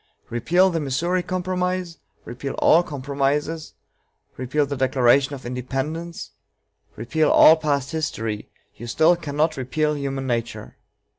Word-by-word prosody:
Repeal 175 +11 +2
the 165 - -1
Missouri 165 +6 -1
Compromise, 180 -1 -3 0.3
repeal 130 +3 -6
all 165 - +4
compromises, 145 +2 -2 0.6
repeal 135 +4 0
the 140 0 -4
Declaration 130 +1 +2
of 130 - -12
Independence, 135 +7 -4 0.6
repeal 150 +7 0
all 160 - +8
past 145 -4 -1
history, 115 -9 -3 0.3
you 120 - -9
still 160 +8 +4
cannot 155 -1 -1
repeal 150 +4 -1
human 135 -1 -3
nature. 120 -2 -4
145 Hz, 120 wpm, -23 LUFS, 130-165 Hz, 0.6 s, all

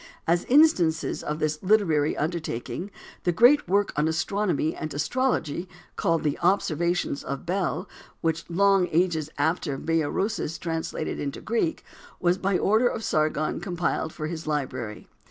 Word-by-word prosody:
As 170 +1 +2
instances 215 - +3
of 150 - -3
this 155 -1 -1
literary 180 -7 +2
undertaking 160 - -3 0.3
the 175 - +2
great 245 - +5
work 200 +2 +2
on 150 +1 +2
astronomy 175 0 0
and 155 - -5
astrology 170 - -1 0.3
called 165 -1 +1
"The 150 -2 -1
Observations 175 -4 +1
of 140 +3 -5
Bel," 180 -1 -1 0.3
which 165 +1 -1
long 195 +1 +3
ages 160 -2 +1
after 145 -1 0
Berosius 165 +3 -1
translated 165 -1 -3
into 140 -1 -4
Greek, 235 +9 -1 0.4
was 180 0 +2
by 195 -1 +1
order 220 +7 +3
of 230 -2 -3
Sargon 155 -3 0
compiled 175 -2 -2
for 155 - -5
his 160 0 -5
library. 130 -7 -3
170 Hz, 135 wpm, -26 LUFS, 155-195 Hz, 0.4 s, great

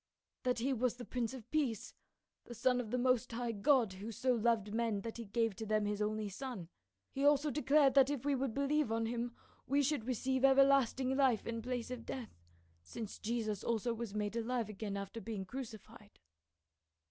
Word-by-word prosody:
"That 250 -1 +1
he 260 +4 0
was 250 -1 0
the 245 0 -8
Prince 245 -2 -2
of 235 -4 -10
Peace, 270 -9 -1 0.5
the 240 - -9
son 250 +2 +2
of 225 - -7
the 250 - 0
most 250 -1 +2
high 240 0 -1
God, 225 -1 +3
who 200 +4 -6
so 255 +4 +1
loved 225 -3 +1
men 225 -3 0
that 225 +2 -6
he 230 - -6
gave 225 0 0
to 220 - -4
them 215 0 +2
his 205 0 -2
only 215 0 -1
son. 200 -4 -6 0.4
He 275 - -2
also 290 +1 +4
declared 280 +1 +4
that 275 -1 +6
if 285 -3 -3
we 290 - +2
would 270 -2 0
believe 280 -2 +1
on 225 0 +1
him 240 +1 -3 0.3
we 280 +2 +3
should 275 -5 0
receive 260 +1 0
everlasting 270 -1 +4
life 265 -5 +3
in 230 0 -3
place 245 0 -3
of 245 -2 -5
death, 250 -3 -6 0.5
since 210 - -7
Jesus 215 -3 -2
also 235 +1 0
was 230 -3 -5
made 210 +1 -2
alive 230 -1 -1
again 205 -1 -4
after 200 +3 -6
being 215 -4 -4
crucified." 220 -2 -9
235 Hz, 195 wpm, -35 LUFS, 220-260 Hz, 0.5 s, that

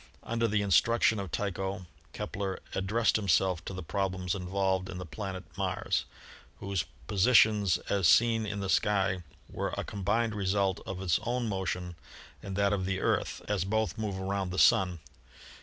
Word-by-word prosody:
Under 115 0 0
the 105 -1 +1
instruction 110 +3 +3
of 100 -2 -4
Tycho, 95 -1 -3 0.3
Kepler 95 -1 -4
ad 95 0 -2
dressed 115 +3 +2
himself 95 -4 +2
to - - -5
the 95 - -5
problems 95 +1 -2
involved 95 0 -1
in 90 - -6
the 90 - -6
planet 95 +2 -6 0.2
Mars, - - -1 0.5
whose 100 -3 -2 0.2
positions 105 - +4
as 100 -4 +2
seen 115 +5 +5
in 100 -1 -3
the 95 - -2
sky 95 -2 +2 0.3
were - - -3
a - - -1
combined 105 +3 -1
result 100 -1 0
of 95 0 -5
its 90 -3 +2
own 120 +1 -1
motion 95 -3 -3 0.5
and 95 -1 -6
that 100 0 +2
of 95 -2 -1
the 95 0 -1
Earth, - - -1
as 105 -4 0
both 110 +2 0
move 100 -3 -3
around 95 0 -2
the 90 - -5
Sun. 90 -2 +4
95 Hz, 165 wpm, -30 LUFS, 95-105 Hz, 0.5 s, seen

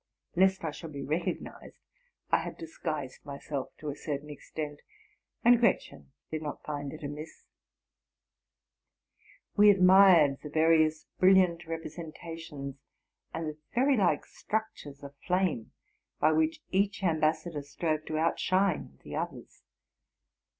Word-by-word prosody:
Lest 190 0 +3
I 160 - -1
should 160 +1 -9
be 140 -1 -5
recognized, 155 +6 -4 0.5
I - - +6
had - - -6
dis 165 -1 -10
guised 145 -6 -4
myself 140 -1 -5
to 150 - -5
a 140 - -4
certain 150 0 -5
extent; 150 0 -6 0.6
and 240 0 +7
Gretchen 75 - 0 0.2
did 155 -1 -3
not 150 -2 -6
find 145 -2 -4
it 155 - -10
amiss. 150 +2 -7 2.1
We 210 0 +7
admired 185 -7 +7
the 150 - -7
various 155 0 +3
brilliant 185 -3 +4
representations 165 -3 -7 0.5
and 165 -1 -4
the 155 0 -6 0.2
fairy 270 +3 +4
like 195 -6 +2
structures 210 -10 -5
of 140 0 -9
flame 180 -10 0 0.5
by 155 - +4
which 160 +1 +1
each 195 +1 +1
ambas 155 -3 +2
sador 155 -5 -5
strove 155 +2 -2
to 155 - -2
outshine 185 +2 +1
the - - -7
others. - - -5
160 Hz, 130 wpm, -30 LUFS, 145-180 Hz, 2.1 s, and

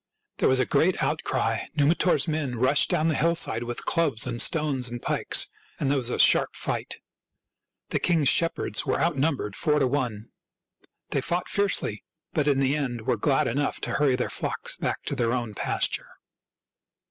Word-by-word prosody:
There - - +2
was 130 0 +3
a 130 - +2
great - - +1
outcry. - - -1
Numitor's 150 +1 +2
men 150 -5 -2
rushed 130 +5 +3
down 165 -3 +1
the 160 - +2
hill 170 +3 +2
side 115 -8 +2
with 120 0 -5
clubs 150 -10 +1
and 120 -2 -1
stones 140 -6 0
and 120 0 -6
pikes, - - 0 0.3
and 140 -2 0
there 145 - +2
was 120 -2 0
a - - -2
sharp - - +4
fight. - - -3 0.9
The - - 0
king's 165 -5 +2
shepherds 165 +4 +2
were 135 -3 -1
out 170 -1 +1
numbered 135 -8 -1
four 150 -1 +1
to 140 - +2
one. 125 -5 -2 0.8
They 140 - 0
fought 175 +6 -2
fiercely, 200 - -1 0.3
but 150 -2 0
in 140 -2 +3
the 135 +1 +2
end 125 -6 -3
were 110 - 0
glad 135 +5 +1
enough 140 +4 -1
to - - -3
hurry 140 -3 +2
their 125 - -2
flocks - - -2
back - - -3
to - - -3
their 120 -3 0
own 120 -4 -3
pasture. - - 0
140 Hz, 180 wpm, -26 LUFS, 120-155 Hz, 0.9 s, sharp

